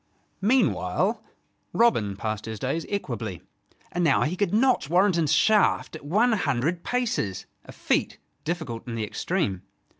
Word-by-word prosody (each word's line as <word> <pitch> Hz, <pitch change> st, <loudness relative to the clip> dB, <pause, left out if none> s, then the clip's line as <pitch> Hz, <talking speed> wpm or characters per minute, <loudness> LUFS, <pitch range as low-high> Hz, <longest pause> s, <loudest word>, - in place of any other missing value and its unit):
Meanwhile 245 Hz, +6 st, +1 dB, 0.5 s
Robin 110 Hz, -, +2 dB
passed 110 Hz, +1 st, -4 dB
his 110 Hz, -1 st, -5 dB
days 135 Hz, +9 st, -2 dB
equably: 115 Hz, -, -4 dB, 0.5 s
and 175 Hz, -, -1 dB
now 165 Hz, -, +4 dB
he 160 Hz, +5 st, -1 dB
could 195 Hz, -2 st, 0 dB
notch 240 Hz, -, +2 dB
Warrenton's 175 Hz, -3 st, +3 dB
shaft 215 Hz, -6 st, +3 dB
at 155 Hz, -, -9 dB
one 210 Hz, +12 st, +2 dB
hundred 165 Hz, -, 0 dB
paces, 235 Hz, -, -1 dB, 0.2 s
a -, -, -10 dB
feat -, -, -1 dB, 0.3 s
difficult 150 Hz, -9 st, -4 dB
in 115 Hz, -, -4 dB
the 110 Hz, -, -2 dB
extreme. 125 Hz, -, -2 dB
165 Hz, 140 wpm, -26 LUFS, -, 0.5 s, now